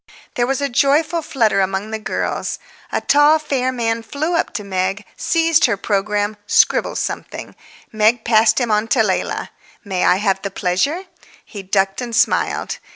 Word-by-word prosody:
There 240 0 0
was 270 +1 -1
a 280 - +1
joyful 300 +6 +2
flutter 225 -10 +1
among 195 +3 -2
the 220 - -3
girls. 215 - -3 0.3
A - - -1
tall, 295 +2 +4
fair 270 -4 -1
man 230 -2 -1
flew 295 +9 -3
up 335 - 0
to 210 - -3
Meg, 195 +1 -2
seized 330 -1 +2
her 230 -5 0
programme, 205 +1 -1
scribbled - - +2
something; - - -5 0.4
Meg 220 +1 +2
passed 225 +1 +4
him 240 -3 -1
on 210 +1 +1
to 230 -1 +3
Leila. 190 -3 -2 0.3
"May 190 -2 -1
I 180 - +4
have 195 -1 0
the 200 - -3
pleasure?" 195 - -1 0.4
He 205 - -9
ducked 195 +2 0
and 240 -2 -4
smiled. - - 0
225 Hz, 165 wpm, -19 LUFS, 200-275 Hz, 0.4 s, tall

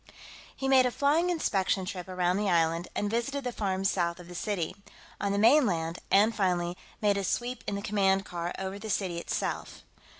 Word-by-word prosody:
He 270 - -3
made 260 -1 +6
a - - -2
flying 300 +7 +2
inspection 195 - 0
trip 185 -3 -5
around 180 0 0
the 205 -1 0
island, 165 0 +2
and 205 - 0
visited 240 +6 -1
the 250 - -2
farms 195 -3 0
south 170 -1 -1
of 175 - -11
the 180 - -10
city, 180 -2 -2 0.4
on 200 - 0
the 200 - 0
mainland, 200 - +3
and, 215 +3 +4
finally, 180 -3 0 0.3
made 205 -2 +3
a 200 - -1
sweep 245 +5 -2
in 205 - -1
the 200 - -4
command 195 -2 +2
car 175 0 -4
over 190 +1 -4
the 220 +1 -7
city 185 -4 -1
itself. - - -3
195 Hz, 195 wpm, -29 LUFS, 180-225 Hz, 0.4 s, made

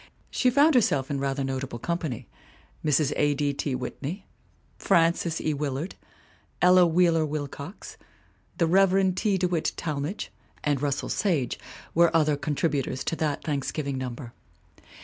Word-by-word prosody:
She 255 - +3
found 285 +5 +5
herself 145 - +2
in 140 - -1
rather 135 0 -1
notable 135 -2 -3
company 160 -3 -3 0.6
Mrs. 150 -1 +2
A. 145 -1 +2
D. 145 0 0
T. 140 -1 -2
Whitney, 140 +9 -5 0.5
Frances 165 0 +2
E. 155 - 0
Willard, 145 +4 -3 0.7
Ella 180 0 +6
Wheeler 165 -1 +3
Wilcox, 150 +3 -6 0.6
the 170 - +3
Rev. 190 +2 +4
T. 195 +1 +1
De 180 0 +1
Witt 170 -3 -1
Talmage 150 +4 -3 0.3
and 145 -3 +1
Russell 145 -2 -1
Sage 165 - 0 0.3
were 170 0 +5
other 155 -2 +3
con 145 +1 -3
tributors 135 -4 -1
to - - -1
that 150 -3 -1
Thanksgiving 140 -1 -2
number. 125 -1 -6
150 Hz, 140 wpm, -26 LUFS, 140-175 Hz, 0.7 s, Ella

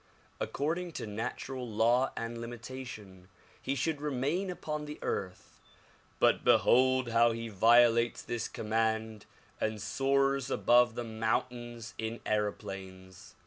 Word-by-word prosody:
According 170 +4 -2
to - - -5
natural 120 +4 -5
law 120 +4 +2
and 115 0 -4
limita 120 +3 -7
tion 95 -5 -11 0.3
he 135 - -2
should 145 +3 -1
remain 150 +7 -1
upon 150 -4 -4
the 150 0 -7
earth, 95 -2 -5 0.6
but - - +3
behold 130 0 +4
how 115 0 +4
he 115 0 -5
violates 115 +3 +4
this 115 -2 -3
command 110 0 -1 0.3
and 110 -1 -1
soars 135 +2 +1
above 120 -2 +4
the 120 - -3
mountains 115 +1 -3
in 110 +1 -3
aeroplanes. 95 -3 -4
120 Hz, 120 wpm, -31 LUFS, 110-130 Hz, 0.6 s, behold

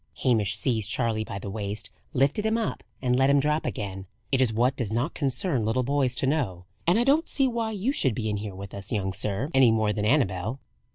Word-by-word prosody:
Hamish 110 -5 +2
seized 110 -2 0
Charley 115 -3 0
by 100 - -6
the 100 0 -6
waist, 105 0 -5 0.2
lifted 140 +8 +1
him 220 +1 +1
up, 225 - -3 0.2
and 125 -1 +2
let 135 +2 +3
him 140 0 +5
drop 150 +1 0
again. 95 -4 -5 0.2
"It 135 -1 +2
is 125 -4 +3
what 120 +4 +1
does 120 -6 -3
not 120 +8 -1
concern 140 - +2
little 115 +4 +1
boys 135 -1 +1
to - - 0
know: 120 - -1 0.2
and 175 +4 +4
I 235 - +3
don't 290 +6 +2
see 270 -2 +3
why 230 -2 -1
you 215 +4 -1
should 130 - 0
be 110 0 -2
in 105 -1 -1
here 100 -2 -6
with 100 0 -9
us, 100 0 -5
young 95 -3 -1
sir, 105 - -1
any 135 -3 +6
more 110 -2 +2
than 105 - -2
Annabel." 110 -2 +1
125 Hz, 230 wpm, -26 LUFS, 105-145 Hz, 0.2 s, any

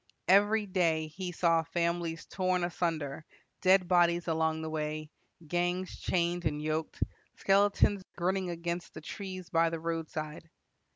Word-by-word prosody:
"Every 205 +3 +5
day 170 -5 +1
he 180 +3 -5
saw 165 -1 +3
families 170 0 -2
torn 185 -1 0
asunder, 165 -4 -2 0.4
dead 185 -1 +5
bodies 175 -1 +3
along 160 -1 0
the 160 - -3
way, 155 0 -3 0.4
gangs 175 +2 -1
chained 175 0 0
and 150 -1 0
yoked, 155 +1 -2 0.3
skeletons 200 0 +3 0.2
grinning 185 +1 0
against 170 0 -4
the 155 - -7
trees 185 +1 -7
by 165 0 +4
the 165 0 -4
roadside. 160 -1 -4
170 Hz, 130 wpm, -31 LUFS, 160-185 Hz, 0.4 s, Every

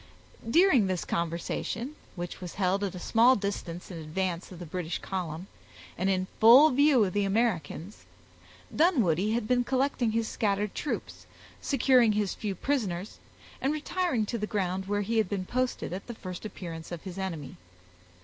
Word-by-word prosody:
During 305 - +5
this 185 -2 -2
conversation, 170 - -3 0.2
which 175 0 -6
was 180 -2 -7
held 195 +1 +1
at 190 -2 -2
a - - -6
small 235 +7 +5
distance 190 -4 -4
in 170 - -6
advance 170 +3 -3
of 180 - -9
the 175 - -7
British 170 +1 -3
column, 180 -3 -4 0.5
and 190 +3 0
in 185 -1 +1
full 255 +8 +8
view 275 -2 +5
of 185 - -3
the 205 - +1
Americans, 195 -4 -1 0.7
Dunwoodie 220 - +3
had 230 -2 -1
been 245 0 +3
collecting 260 -1 +1
his 225 -1 0
scattered 205 -1 -1
troops, 300 - -5 0.3
securing 255 -5 +4
his 205 -3 0
few 205 -3 -4
prisoners, 205 -6 -2 0.4
and 270 - +1
retiring 305 -5 -1
to 235 +2 -3
the 210 - -2
ground 190 -2 -2
where 205 0 0
he 225 +3 0
had 210 -4 +1
been 195 -2 -2
posted 255 -5 -2
at 190 - -6
the 240 - -6
first 185 -1 -7
appearance 170 -5 -7
of 170 -2 -6
his 190 -1 -7
enemy. 165 -8 -5
200 Hz, 170 wpm, -28 LUFS, 180-240 Hz, 0.7 s, full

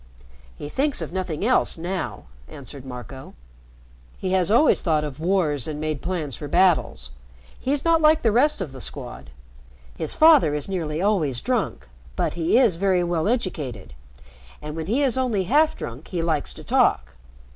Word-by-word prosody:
"He 145 - -7
thinks 275 - 0
of 165 0 -5
nothing 185 -1 -3
else 255 -6 +2
now," 180 +3 -4 0.2
answered 135 0 -10
Marco. 130 +1 -9 0.8
"He 185 - -3
has 185 -2 +2
always 240 +8 +4
thought 155 -3 +1
of 145 -2 -6
wars 160 -6 0
and 150 -1 -5
made 155 -2 -3
plans 165 -8 -3
for 145 - -7
battles. 160 - +1 0.5
He's 280 +3 -1
not 330 -1 +3
like 310 0 +4
the 225 - +3
rest 270 +3 +3
of 165 -7 -4
the 130 -1 -9
Squad. 65 - -6 0.7
His 160 - -3
father 305 - +6
is 150 - -2
nearly 170 -3 -3
always 160 - +1
drunk, 245 - -2 0.3
but - - -1
he 170 +6 +1
is 230 -10 +4
very 185 -1 +2
well 170 0 -1
educated, 145 - -3 0.7
and, 150 0 -7
when 160 0 -5
he 250 +8 +1
is 260 -2 +1
only 230 -7 0
half 300 - +2
drunk, 125 +6 -8
he 175 -3 -3
likes 160 -3 0
to - - -8
talk. 65 +3 +1
170 Hz, 170 wpm, -23 LUFS, 150-220 Hz, 0.8 s, father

